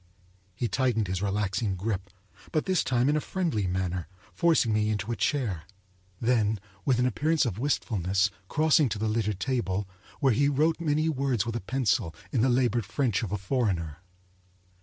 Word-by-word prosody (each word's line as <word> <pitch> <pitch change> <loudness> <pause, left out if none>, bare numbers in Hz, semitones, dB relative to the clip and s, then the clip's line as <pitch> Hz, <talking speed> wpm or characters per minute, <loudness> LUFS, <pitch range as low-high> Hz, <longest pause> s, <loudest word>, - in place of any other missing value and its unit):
He 120 - -1
tightened 120 -4 +1
his 90 0 -2
relaxing 100 0 -1
grip, 100 0 -3 0.4
but 155 - 0
this 185 -3 +2
time 125 -1 +1
in 145 - +3
a 150 - +1
friendly 155 - -1
manner, 90 -1 -2 0.3
forcing 165 -10 +3
me 105 0 +1
into 105 +1 -2
a - - 0
chair; 115 - -1 0.5
then 110 -3 +2 0.3
with 130 -4 +3
an 125 - +2
appearance 150 +6 +1
of 110 -4 -3
wistfulness 100 -8 +1 0.2
crossing 155 0 +3
to 110 - -3
the 110 +2 -1
littered 105 -3 -1
table, 105 -6 -1 0.3
where 135 -4 +3
he 140 +5 +3
wrote 155 +4 +1
many 155 0 +1
words 135 -7 0
with 115 0 -3
a 120 - -2
pencil, 110 -7 0 0.2
in 120 - +1
the 130 - +3
labored 120 -4 +1
French 125 -8 0
of 110 - -4
a 105 - 0
foreigner. 95 - -1
115 Hz, 175 wpm, -28 LUFS, 100-135 Hz, 0.5 s, in